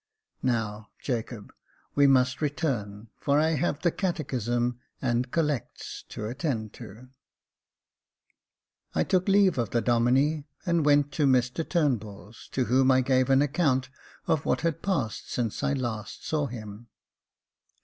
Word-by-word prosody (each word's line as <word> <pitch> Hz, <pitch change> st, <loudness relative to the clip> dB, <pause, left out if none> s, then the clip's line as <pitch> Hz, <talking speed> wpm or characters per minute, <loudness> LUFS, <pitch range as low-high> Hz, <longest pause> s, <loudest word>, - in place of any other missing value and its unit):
Now, 110 Hz, -4 st, -1 dB
Jacob, 115 Hz, -4 st, -4 dB, 0.4 s
we 140 Hz, -1 st, +5 dB
must 130 Hz, 0 st, +3 dB
return, 115 Hz, -9 st, -2 dB
for 145 Hz, 0 st, +2 dB
I 160 Hz, +1 st, +3 dB
have 155 Hz, 0 st, -1 dB
the 170 Hz, -, +3 dB
catechism 125 Hz, -, -1 dB, 0.2 s
and 125 Hz, 0 st, 0 dB
collects 150 Hz, -5 st, -2 dB
to 105 Hz, -, -6 dB
attend 120 Hz, -3 st, -3 dB
to." 115 Hz, +6 st, -11 dB, 1.9 s
I -, -, +3 dB
took 185 Hz, 0 st, +1 dB
leave 195 Hz, -6 st, +4 dB
of 115 Hz, -4 st, 0 dB
the 120 Hz, -, +1 dB
Domine, 125 Hz, +6 st, +2 dB, 0.2 s
and 170 Hz, -3 st, +2 dB
went 145 Hz, 0 st, +4 dB
to 140 Hz, +1 st, +1 dB
Mr 130 Hz, +4 st, +2 dB
Turnbuli's, 115 Hz, -, -2 dB
to 130 Hz, -, -1 dB
whom 130 Hz, +2 st, +3 dB
I 130 Hz, 0 st, +5 dB
gave 130 Hz, 0 st, +2 dB
an 135 Hz, +1 st, +5 dB
account 140 Hz, -4 st, +1 dB, 0.3 s
of 155 Hz, -, +1 dB
what -, -, 0 dB
had 165 Hz, -1 st, -1 dB
passed 140 Hz, -, -2 dB
since 115 Hz, -4 st, -2 dB
I -, -, +1 dB
last 120 Hz, -6 st, -4 dB
saw 150 Hz, -2 st, 0 dB
him. 110 Hz, -2 st, -9 dB
130 Hz, 140 wpm, -27 LUFS, 120-150 Hz, 1.9 s, we